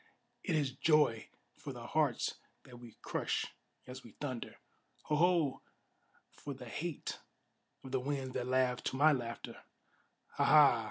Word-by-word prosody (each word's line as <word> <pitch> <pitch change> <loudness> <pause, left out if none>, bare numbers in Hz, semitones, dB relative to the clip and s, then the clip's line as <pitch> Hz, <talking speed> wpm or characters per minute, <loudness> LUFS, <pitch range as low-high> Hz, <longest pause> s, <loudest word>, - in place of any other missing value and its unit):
it 180 - 0
is 145 -4 +1
joy 150 -5 +3 0.3
for - - -7
the - - -8
hearts - - +1 0.3
that 120 -2 -12
we 120 -2 -12
crush - - -1 0.4
as 130 +1 -8
we 115 - -14
thunder! 130 -5 -4 0.5
Ho! 150 - 0
Ho! 165 -3 +3 0.7
for 140 -1 -7
the 125 - -10
hate 155 +6 -4 0.6
of 130 - -9
the 130 - +1
winds 135 -1 -3
that 125 -1 -2
laugh 130 -1 +2
to - - -1
my 150 +4 +6
laughter! 120 -4 -4 0.8
Ha! - - +3
Ha! 145 -6 +7
130 Hz, 150 wpm, -34 LUFS, 125-150 Hz, 0.8 s, Ha